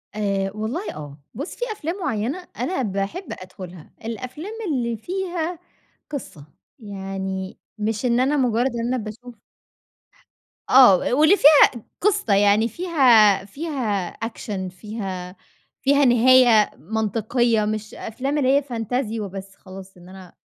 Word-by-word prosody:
آآ 195 Hz, -2 st, -1 dB
والله 225 Hz, -, -4 dB
آه. 145 Hz, -2 st, -9 dB, 0.2 s
بُص، 280 Hz, -, -6 dB
في -, -, -3 dB
أفلام 345 Hz, -5 st, -4 dB
معيّنة 275 Hz, -, -3 dB
أنا 370 Hz, -, -1 dB
باحب 200 Hz, -, -3 dB
أدخُلها. 185 Hz, -2 st, -11 dB
الأفلام 255 Hz, -, -6 dB, 0.2 s
اللي 235 Hz, -3 st, -1 dB
فيها 350 Hz, -, -4 dB, 0.5 s
قصة. 245 Hz, -, -7 dB, 0.3 s
يعني 195 Hz, -2 st, -5 dB, 0.2 s
مش 215 Hz, +2 st, -2 dB
إن 240 Hz, 0 st, +2 dB
أنا 275 Hz, +4 st, +2 dB
مُجرّد 250 Hz, 0 st, +1 dB
إن 235 Hz, 0 st, -2 dB
أنا -, -, 0 dB
باشوف 235 Hz, +2 st, -8 dB, 1.3 s
آه. 250 Hz, -8 st, +8 dB
و 250 Hz, +9 st, -1 dB
واللي 310 Hz, +7 st, +6 dB
فيها 300 Hz, -2 st, +8 dB, 0.3 s
قصة. 400 Hz, -, +2 dB
يعني 205 Hz, +3 st, +4 dB
فيها 240 Hz, -, +4 dB
فيها 220 Hz, -, -3 dB
أكشن، 210 Hz, -4 st, -5 dB
فيها 185 Hz, -2 st, -7 dB, 0.5 s
فيها 280 Hz, +1 st, +4 dB
نهاية 245 Hz, -3 st, +5 dB
منطقية 220 Hz, -, 0 dB
مش 215 Hz, 0 st, -4 dB
أفلام 270 Hz, +6 st, -3 dB
اللي 270 Hz, 0 st, +3 dB
هي 285 Hz, -, +2 dB
فنتازي 235 Hz, -2 st, -3 dB
وبس 195 Hz, -1 st, -7 dB
خلاص 190 Hz, 0 st, -12 dB
إن 175 Hz, 0 st, -15 dB
أنا 185 Hz, -1 st, -13 dB
225 Hz, 130 wpm, -22 LUFS, 195-270 Hz, 1.3 s, آه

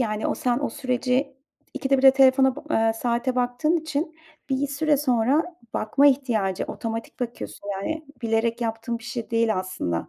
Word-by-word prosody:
yani 215 Hz, -3 st, -1 dB
o -, -, 0 dB
sen 245 Hz, -1 st, 0 dB
o 285 Hz, -, -2 dB
süreci 255 Hz, +1 st, -1 dB, 0.4 s
ikide 275 Hz, -1 st, +1 dB
birde 265 Hz, 0 st, +8 dB
telefona 265 Hz, -1 st, +4 dB
ba -, -, -8 dB
ııı, 225 Hz, -4 st, +2 dB
saate 240 Hz, +2 st, -1 dB
baktığım 250 Hz, +6 st, +1 dB
için 315 Hz, 0 st, -3 dB, 0.3 s
bir 270 Hz, +1 st, +1 dB
süre 290 Hz, +1 st, +1 dB
sonra 275 Hz, +6 st, +1 dB, 0.2 s
bakma 275 Hz, +7 st, +3 dB
ihtiyacı 235 Hz, -9 st, +1 dB
otomatik 225 Hz, +1 st, -6 dB
bakıyorsun 235 Hz, -4 st, -6 dB
yani 300 Hz, +11 st, -4 dB, 0.2 s
bilerek 230 Hz, +1 st, 0 dB
yaptığım 230 Hz, +1 st, -3 dB
bir 225 Hz, -, -15 dB
şey 240 Hz, -1 st, -5 dB
değil 230 Hz, -3 st, +2 dB
aslında. 185 Hz, -, -3 dB
250 Hz, 160 wpm, -24 LUFS, 225-275 Hz, 0.4 s, birde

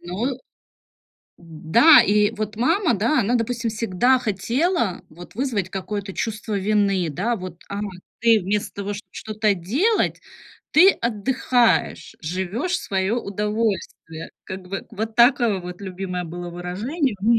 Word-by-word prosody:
Ну. 200 Hz, +10 st, -3 dB, 1.0 s
Да, 170 Hz, -, +5 dB
и, 210 Hz, +1 st, +3 dB
вот, 215 Hz, 0 st, -3 dB
мама, 255 Hz, -, +2 dB
да, 230 Hz, +9 st, +1 dB
она, 230 Hz, +3 st, 0 dB
допустим, 235 Hz, 0 st, -1 dB
всегда 230 Hz, +4 st, +2 dB
хотела, 235 Hz, -, 0 dB
вот, 175 Hz, +3 st, -13 dB
вызвать 225 Hz, -6 st, -1 dB
какое-то 195 Hz, +1 st, -5 dB
чувство 215 Hz, 0 st, -3 dB
вины, 195 Hz, -3 st, +1 dB
да. 205 Hz, +11 st, -1 dB
Вот: 180 Hz, -3 st, -8 dB
"А, 200 Hz, 0 st, -4 dB, 0.4 s
ты 230 Hz, -2 st, +5 dB
вместо 200 Hz, +2 st, -2 dB
того, 200 Hz, 0 st, -4 dB
шт 205 Hz, -, -7 dB
что-то 215 Hz, -1 st, -1 dB
делать, 270 Hz, -, 0 dB, 0.5 s
ты 365 Hz, +5 st, +8 dB
отдыхаешь, 240 Hz, -, 0 dB
живёшь 190 Hz, -, -3 dB
в -, -, 0 dB
своё 195 Hz, +4 st, 0 dB
удовольствие". 205 Hz, -6 st, -3 dB
Как 190 Hz, 0 st, -7 dB
бы, 190 Hz, +2 st, -6 dB
вот 220 Hz, +1 st, -4 dB
такое 235 Hz, -5 st, +4 dB
вот 180 Hz, +1 st, -8 dB
любимое 185 Hz, -1 st, -4 dB
было 175 Hz, +1 st, -7 dB
выражение 205 Hz, -, -2 dB
у -, -, -6 dB
н 230 Hz, -, +4 dB
210 Hz, 140 wpm, -22 LUFS, 185-235 Hz, 1.0 s, ты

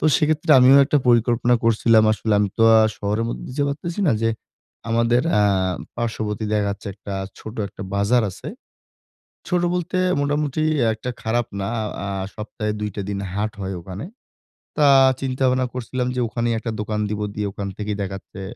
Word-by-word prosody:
তো -, -, -3 dB
সেক্ষেত্রে, 155 Hz, 0 st, 0 dB
আমিও 130 Hz, +2 st, +7 dB
একটা 145 Hz, +1 st, +2 dB
পরিকল্পনা 120 Hz, +1 st, +3 dB
করছিলাম 115 Hz, -1 st, +4 dB
আসলে 110 Hz, 0 st, -1 dB
আমি 105 Hz, -1 st, +2 dB
তো -, -, +4 dB, 0.2 s
আ -, -, +6 dB, 0.2 s
শহরের 105 Hz, +3 st, -1 dB
মধ্যে -, -, -6 dB
যে -, -, +3 dB
পারতিছি 170 Hz, +6 st, -4 dB
না 145 Hz, -, +4 dB
যে, 115 Hz, -, +3 dB, 0.6 s
আমাদের 115 Hz, +2 st, +2 dB
অ্যা 105 Hz, -, +4 dB, 0.5 s
পার্শ্ববর্তী 110 Hz, -2 st, -3 dB
দেখাচ্ছে 100 Hz, 0 st, -2 dB
একটা 100 Hz, -1 st, -7 dB, 0.2 s
ছোট, 110 Hz, +1 st, -9 dB
একটা -, -, -9 dB
বাজার 110 Hz, +4 st, +3 dB
আছে। -, -, -9 dB, 1.0 s
ছোট 180 Hz, -1 st, +1 dB
বলতে, 180 Hz, +1 st, -2 dB, 0.2 s
মোটামুটি 145 Hz, +1 st, 0 dB, 0.3 s
একটা 120 Hz, +3 st, -6 dB
খারাপ 120 Hz, +1 st, 0 dB
না। 100 Hz, -, -2 dB
আ -, -, -2 dB, 0.2 s
আ -, -, -4 dB, 0.3 s
সপ্তাহে 105 Hz, 0 st, -4 dB
২ 105 Hz, -, -2 dB
টা 100 Hz, -, -3 dB
দিন 100 Hz, -1 st, -3 dB
হাট 105 Hz, +2 st, -1 dB
হয় 95 Hz, 0 st, -4 dB
ওখানে। 95 Hz, -, -7 dB, 0.7 s
তা 150 Hz, -2 st, +5 dB, 0.3 s
চিন্তা-ভাবনা 130 Hz, -1 st, +1 dB
করছিলাম 125 Hz, 0 st, -3 dB
যে, -, -, -1 dB
ওখানেই 115 Hz, +1 st, -1 dB
একটা 115 Hz, -1 st, -4 dB
দোকান 105 Hz, 0 st, -2 dB
দিব। 105 Hz, 0 st, -3 dB, 0.2 s
দিয়ে, 105 Hz, -1 st, -2 dB
ওখান 100 Hz, 0 st, -5 dB
থেকেই 105 Hz, -1 st, -3 dB
দেখাচ্ছে 95 Hz, 0 st, -7 dB
115 Hz, 170 wpm, -22 LUFS, 105-130 Hz, 1.0 s, আমিও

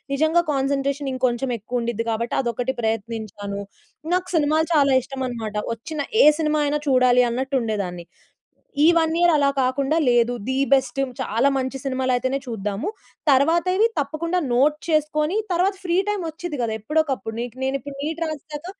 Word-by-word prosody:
నిజంగా 315 Hz, +4 st, +3 dB
కాన్సన్‌ట్రేషన్ 275 Hz, 0 st, -1 dB
ఇంకొంచెం 255 Hz, 0 st, 0 dB
ఎక్కువ 245 Hz, +4 st, -3 dB
ఉండిద్ది 230 Hz, -1 st, -2 dB
కాబట్టి 230 Hz, +2 st, -2 dB
అదొకటి 245 Hz, +1 st, -2 dB
ప్రయత్నించాను. 215 Hz, -2 st, -3 dB, 0.5 s
నాకు 365 Hz, 0 st, 0 dB
సినిమాలు 315 Hz, +1 st, +2 dB
చాలా 280 Hz, -3 st, +4 dB
ఇష్టమనమాట. 250 Hz, -5 st, -5 dB, 0.2 s
వచ్చిన 290 Hz, +6 st, -5 dB, 0.2 s
ఏ -, -, +7 dB
సినిమా 305 Hz, -1 st, +1 dB
అయినా 295 Hz, +1 st, +1 dB
చూడాలి 255 Hz, -1 st, +5 dB
అన్నట్టు 265 Hz, +3 st, -2 dB
ఉండేదాన్ని. 195 Hz, -6 st, -3 dB, 0.8 s
ఈ -, -, +6 dB
1 320 Hz, -1 st, +2 dB
ఇయర్ 345 Hz, 0 st, +5 dB
అలా 280 Hz, -1 st, +3 dB
కాకుండా 270 Hz, +4 st, 0 dB
లేదు 240 Hz, 0 st, +3 dB, 0.2 s
ది 260 Hz, -, 0 dB, 0.2 s
బెస్ట్ 265 Hz, 0 st, +2 dB, 0.2 s
చాలా 235 Hz, +6 st, +1 dB
మంచి 265 Hz, +1 st, -2 dB
సినిమాలయితేనే 260 Hz, 0 st, 0 dB
చూద్దాము. 215 Hz, -, -3 dB, 0.4 s
తరువాత 320 Hz, +6 st, +3 dB
ఇవి 440 Hz, -, +5 dB
తప్పకుండా 315 Hz, +5 st, -1 dB
నోట్ 290 Hz, +5 st, +3 dB
చేసుకొని 305 Hz, +2 st, +1 dB, 0.2 s
తరువాత 370 Hz, +3 st, +2 dB
ఫ్రీ 345 Hz, 0 st, +1 dB
టైమ్ 415 Hz, -2 st, -1 dB
వచ్చిద్ది 315 Hz, -1 st, -6 dB
కదా! 225 Hz, -, -1 dB
ఎప్పుడోకప్పుడు 270 Hz, -3 st, -1 dB, 0.3 s
నేను 265 Hz, +1 st, 0 dB
ఇప్పుడు 285 Hz, 0 st, -9 dB
నీట్ 320 Hz, +2 st, -3 dB
రాసేసాక 305 Hz, +1 st, -7 dB
270 Hz, 145 wpm, -22 LUFS, 240-310 Hz, 0.8 s, ఏ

